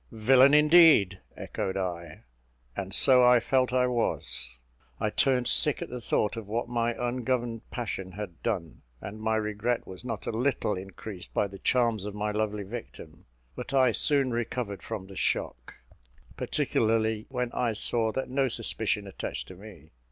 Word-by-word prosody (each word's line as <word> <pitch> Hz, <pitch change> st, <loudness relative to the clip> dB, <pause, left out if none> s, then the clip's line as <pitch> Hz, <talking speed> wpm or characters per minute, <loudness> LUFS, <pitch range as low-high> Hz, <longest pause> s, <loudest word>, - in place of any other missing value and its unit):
"Villain, 130 Hz, +5 st, +5 dB
indeed," 150 Hz, -, +6 dB, 0.2 s
echoed 95 Hz, 0 st, -4 dB
I; 85 Hz, -3 st, -5 dB, 0.5 s
and 95 Hz, -1 st, -5 dB
so 125 Hz, +4 st, +6 dB
I 125 Hz, 0 st, +6 dB
felt 130 Hz, +1 st, +1 dB
I 125 Hz, 0 st, +2 dB
was. 110 Hz, -, -2 dB, 0.4 s
I 105 Hz, -, -1 dB
turned 125 Hz, 0 st, +2 dB
sick 150 Hz, -, +3 dB
at -, -, -9 dB
the 125 Hz, -1 st, -5 dB
thought 105 Hz, -1 st, 0 dB
of 115 Hz, -3 st, -7 dB
what 115 Hz, +4 st, -2 dB
my 120 Hz, -1 st, -1 dB
ungoverned 120 Hz, -1 st, -2 dB
passion 95 Hz, -6 st, -5 dB
had 95 Hz, -4 st, -8 dB
done; 90 Hz, -9 st, -3 dB, 0.2 s
and 105 Hz, +2 st, -8 dB
my 110 Hz, 0 st, 0 dB
regret 110 Hz, +2 st, -1 dB
was 95 Hz, +3 st, -10 dB
not 115 Hz, -5 st, -5 dB
a -, -, -2 dB
little 115 Hz, -2 st, 0 dB
increased 95 Hz, 0 st, -8 dB
by -, -, +2 dB
the 100 Hz, -1 st, -9 dB
charms 115 Hz, -5 st, +1 dB
of 105 Hz, -1 st, -6 dB
my 105 Hz, 0 st, -2 dB
lovely 105 Hz, -1 st, -2 dB
victim; 100 Hz, -7 st, -10 dB, 0.3 s
but 140 Hz, -, -5 dB
I 130 Hz, -2 st, +5 dB
soon 140 Hz, +2 st, +2 dB
recovered 115 Hz, -3 st, -3 dB
from 110 Hz, -4 st, -6 dB
the 95 Hz, 0 st, -12 dB
shock, -, -, -2 dB, 0.6 s
particularly 110 Hz, -1 st, 0 dB
when 125 Hz, -2 st, -2 dB
I 120 Hz, -2 st, -1 dB
saw 110 Hz, +1 st, +1 dB
that 135 Hz, +4 st, -3 dB
no 135 Hz, +1 st, +1 dB
suspicion 110 Hz, -3 st, -1 dB
attached 95 Hz, -, -6 dB
to 95 Hz, -, -10 dB
me. 90 Hz, -6 st, -14 dB
110 Hz, 165 wpm, -28 LUFS, 100-125 Hz, 0.6 s, indeed